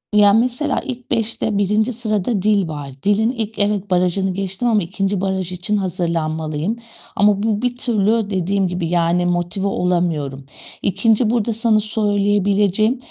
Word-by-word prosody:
Ya, 205 -1 +6
mesela, 250 +5 +1
ilk 250 -3 -7
5'te 220 -2 0
1. 210 +4 +1
sırada 215 -2 -1
dil 205 -3 +2
var. 145 -3 -6
Dilin 210 +3 +2
ilk 220 -3 -4
evet, 205 -1 0
barajını 180 +1 +1
geçtim 195 +5 -2
ama 215 -3 +3
2. 195 +2 -2
baraj 190 -2 -2
için 180 +4 -1
hazırlanmalıyım 165 -1 -2 0.4
ama 205 0 +3
bu 215 -1 0
bir 245 0 -1
türlü 220 -3 +1
dediğim 190 0 0
gibi, 180 -2 -3
yani 175 +1 +1
motive 175 +3 -1
olamıyorum. 165 -8 -1 0.4
2. 220 +3 +2
burada 230 -1 0
sana 225 -1 +2
söyleyebileceğim 205 +1 +1
200 Hz, 140 wpm, -19 LUFS, 180-220 Hz, 0.4 s, Ya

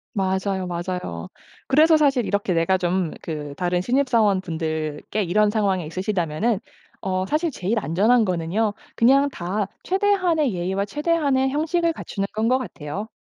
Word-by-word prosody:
맞아요, 190 -1 -1
맞아요. 175 - -4 0.4
그래서 310 +4 +5
사실 275 -6 +2
이렇게 200 -2 0
내가 170 +3 +2
좀 180 -2 0
그 150 -3 -5
다른 180 -1 0
신입 265 +6 +1
사원분들께 170 -4 0
이런 210 +4 +2
상황이 195 -5 0
있으시다면은 185 +3 -1 0.4
어 185 -1 -1
사실 310 - 0
제일 215 -1 -1
안전한 215 +8 +3
거는요. 185 +4 0 0.2
그냥 275 +4 +4
다 195 0 -2 0.2
최대한의 370 - +2
예의와 190 +3 -1
최대한의 285 0 +1
형식을 330 +3 0
갖추는 200 -8 -4
건 220 +1 +1
것 255 +1 +4
같아요. 200 - -6
200 Hz, 335 characters per minute, -23 LUFS, 180-260 Hz, 0.4 s, 그래서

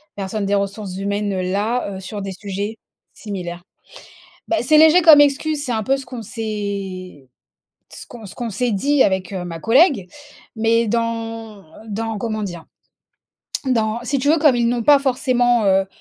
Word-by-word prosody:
personne 200 +1 -3
des 200 +1 +1
ressources 200 -1 -3
humaines-là, 200 +2 -2
heu, - - -7
sur 205 +2 -6
des 195 0 -5
sujets 200 +2 -5 0.4
similaires. 180 -4 -7 0.8
Bah, 335 - +1
c'est 305 +5 +4
léger 320 +3 +7
comme 310 -3 +9
excuse, 290 +1 +1
c'est 255 - -3
un 220 -2 -1
peu 270 +6 +2
ce 270 -1 -7
qu'on 245 -2 -8
s'est, 200 - -5 0.6
ce - - -10
qu'on 240 -2 -11
s 195 - -8
ce - - -12
qu'on 240 -2 -4
s'est 235 +4 -1
dit 275 +7 +2
avec 190 -2 0
ma 175 -3 -5
collègue 245 - +3 0.5
mais 230 +1 +2
dans 225 -2 -3 0.3
dans, 220 +1 -3
comment 215 0 -3
dire? 175 -5 -6 1.0
Dans, 225 -3 0
si 275 +3 0
tu 285 - 0
veux 320 +2 +4
comme 295 -4 +4
ils 235 -1 +1
n'ont 240 0 0
pas 290 +3 +7
forcément, 245 -3 +1
heu, 190 0 +3
220 Hz, 170 wpm, -20 LUFS, 195-245 Hz, 1.0 s, comme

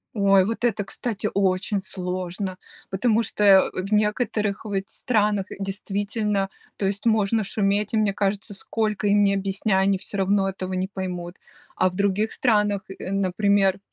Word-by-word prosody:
Ой, 195 -2 +4
вот 225 +2 -3
это, 220 -4 +1
кстати, 215 +1 -4
очень 195 +1 +1
сложно, 185 0 -4 0.3
потому 225 +3 +2
что, 210 - -2
э, 195 -2 +7
в 190 +3 -4
некоторых 210 -1 0
ведь 195 -2 -2
странах, 210 -5 0
действительно, 200 +1 -2 0.3
то 200 - -1
есть 205 +4 -1
можно 220 0 +2
шуметь, 205 +1 0
и - - +3
мне 210 -2 +2
кажется, 200 +1 -2
сколько 215 +1 -2
им 205 0 +4
не 200 0 +3
объясняй, 195 0 0
они 195 0 +2
всё 200 - -6
равно 195 0 +2
этого 185 -1 -5
не 185 +1 -1
поймут. 180 -2 -5 0.4
А - - +3
в 180 - -11
других 200 +2 +1
странах, 210 -4 +2
э, 195 0 -7
например 195 0 +2
200 Hz, 160 wpm, -24 LUFS, 190-210 Hz, 0.4 s, э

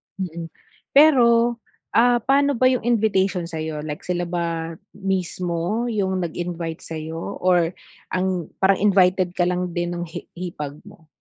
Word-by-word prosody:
Mm. 170 -4 -5 0.5
Pero, 240 -5 +5 0.3
ah, 240 +1 +5
paano 280 +2 +3
ba 255 - +3
yung 255 - 0
invitation 200 -6 +2
sa'yo 155 -2 -4
like 150 -1 -5
sila 175 -1 0
ba 165 -1 -3 0.2
mismo 185 +1 -1
yung 190 -4 0
nag-invite 170 -1 -4
sa'yo 160 +1 -6
or 175 -2 +3 0.4
ang 185 -3 -1 0.2
parang 195 0 +5
invited 185 -3 +3
ka 175 - +3
lang 180 -1 -1
din 175 0 -1
nung 175 0 -4
hi 165 - -7 0.2
hipag 150 -5 -5
mo? 160 - -16
180 Hz, 140 wpm, -22 LUFS, 170-200 Hz, 0.5 s, Pero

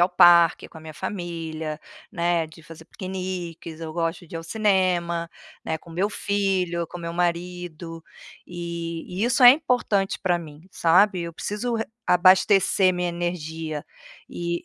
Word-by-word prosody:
ao 175 - +5
parque 175 -2 +6
com - - -13
a - - -14
minha 155 -1 -10
família, 160 -4 -5 0.3
né, 170 -3 0
de 160 +1 -16
fazer 160 +1 -13
piqueniques, 180 -3 -6
eu 160 -1 -6
gosto 165 +1 -2
de 165 - -13
ir - - -2
ao 165 - -7
cinema, 180 -4 +1 0.4
né, 160 - -1
com 165 - -16
meu 180 +5 0
filho, 190 -5 -1
com - - -9
meu 170 0 -5
marido, 175 -1 -3 0.4
e 170 -1 -5 0.2
e 220 - +2
isso 250 +2 +2
é 245 - +12
importante 245 -9 +1
para 175 -2 +2
mim, 155 0 -12
sabe? 180 +3 +3
Eu 170 -1 -6
preciso 210 +7 -3
re 225 - -1 0.2
abastecer 185 +1 +4
minha 180 0 -1
energia 160 -3 -4 0.4
e 170 0 -4
175 Hz, 155 wpm, -24 LUFS, 165-185 Hz, 0.4 s, é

